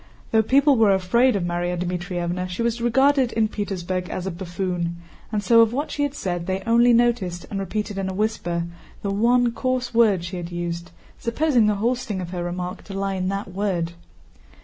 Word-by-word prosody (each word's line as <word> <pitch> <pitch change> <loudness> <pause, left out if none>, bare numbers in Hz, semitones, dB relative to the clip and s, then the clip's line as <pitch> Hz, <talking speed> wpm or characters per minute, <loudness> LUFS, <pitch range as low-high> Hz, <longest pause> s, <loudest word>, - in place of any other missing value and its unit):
Though 220 - +5
people 275 +4 +4
were 210 -3 +5
afraid 235 +7 +3
of 195 - 0
Márya 175 +1 -1
Dmítrievna 180 0 -3
she 180 +6 -3
was 235 0 -1
regarded 265 +1 +3
in 220 -1 +2
Petersburg 185 -4 -3
as 185 - -4
a 190 - -2
buffoon, 175 -1 -3 0.4
and 210 -2 -1
so 230 +3 +6
of 225 0 +3
what 285 +4 -2
she 290 - -3
had 285 -1 0
said 175 -5 -3
they 190 0 -2
only 235 +1 +5
noticed, 230 -7 +1
and 200 - -2
repeated 205 +1 -3
in 190 -1 -2
a - - -4
whisper, 185 -5 -1 0.4
the 200 - -1
one 240 +4 +3
coarse 255 0 -2
word 215 -6 +4
she 180 +1 -5
had 175 0 -6
used, 170 0 -4 0.3
supposing 240 -1 +2
the 210 - +2
whole 230 +5 +1
sting 225 -6 -4
of 180 -1 -5
her 175 -1 -3
remark 180 +1 -4
to 195 -2 -6
lie 195 0 -1
in 185 -1 -1
that 195 0 -3
word. 185 -4 -1
195 Hz, 200 wpm, -23 LUFS, 180-235 Hz, 0.4 s, so